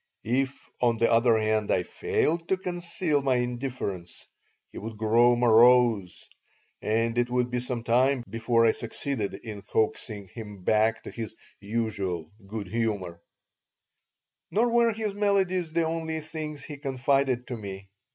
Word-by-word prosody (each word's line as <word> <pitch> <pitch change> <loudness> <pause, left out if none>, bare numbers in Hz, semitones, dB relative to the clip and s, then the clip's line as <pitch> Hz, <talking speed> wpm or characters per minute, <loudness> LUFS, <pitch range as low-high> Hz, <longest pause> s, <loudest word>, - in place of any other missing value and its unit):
If, 130 +4 -1
on 120 -2 +3
the 115 - +3
other 115 0 +4
hand, 110 -1 0
I 90 - +2
failed 165 - -1
to 190 - +2
conceal 175 -4 -1
my 135 -2 +2
indifference, 120 -8 -4 0.4
he - - -8
would 110 +1 -7
grow 115 +3 +4
morose, 120 -4 +4 0.5
and 115 +2 0
it 120 0 +1
would 125 0 0
be 125 - 0
some 120 -1 -3
time 125 +2 +3
before 115 +2 +2
I 115 - +6
succeeded 115 -3 -3
in 105 0 -8
coaxing 105 -1 -2
him 105 -3 -9
back 110 +3 +2
to - - -8
his 110 -2 -6 0.2
usual 100 -6 -3 0.2
good 105 0 -5
humor 100 -6 -2 1.3
Nor 235 +4 +2
were 235 -1 +4
his 215 -2 -3
melodies 190 -4 +1
the 165 0 +1
only 160 0 -2
things 155 -1 -6
he 150 - -7
confided 135 -2 0
to 125 - -3
me. 100 -2 -8
120 Hz, 145 wpm, -27 LUFS, 110-140 Hz, 1.3 s, I